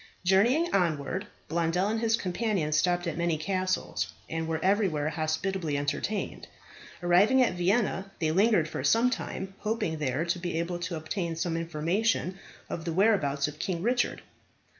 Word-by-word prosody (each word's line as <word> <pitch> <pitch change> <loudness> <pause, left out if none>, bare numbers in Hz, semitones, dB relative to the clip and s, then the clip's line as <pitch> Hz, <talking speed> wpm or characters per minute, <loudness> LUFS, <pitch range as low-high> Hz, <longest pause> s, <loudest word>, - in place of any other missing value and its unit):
Journeying 235 - +3
onward, 175 +1 0 0.2
Blondel 170 +3 +1
and 220 +1 0
his 225 0 +2
companion 185 -4 -1
stopped 175 +3 +2
at 170 -1 -3
many 170 -2 +1
castles, 185 +3 -1 0.2
and 160 0 -3
were 160 -1 -1
everywhere 185 -7 +2
hospitably 160 0 -1
entertained. 145 +9 -2 0.6
Arriving 190 +9 +5
at 230 - +1
Vienna 195 +2 +1
they 155 -2 0
lingered 195 -2 +3
for - - -5
some 235 +2 +4
time, 190 -5 -4
hoping 210 -8 -2
there 145 +2 0
to 170 +1 -1
be 175 -2 -3
able 175 +1 -2
to 175 0 -3
obtain 165 +2 -3
some 165 +1 -1
information 170 +4 0 0.3
of 165 - -5
the 165 -1 -2
whereabouts 160 -8 +2
of 150 0 -8
King 175 -2 -2
Richard. 245 +2 0
175 Hz, 155 wpm, -28 LUFS, 160-200 Hz, 0.6 s, Arriving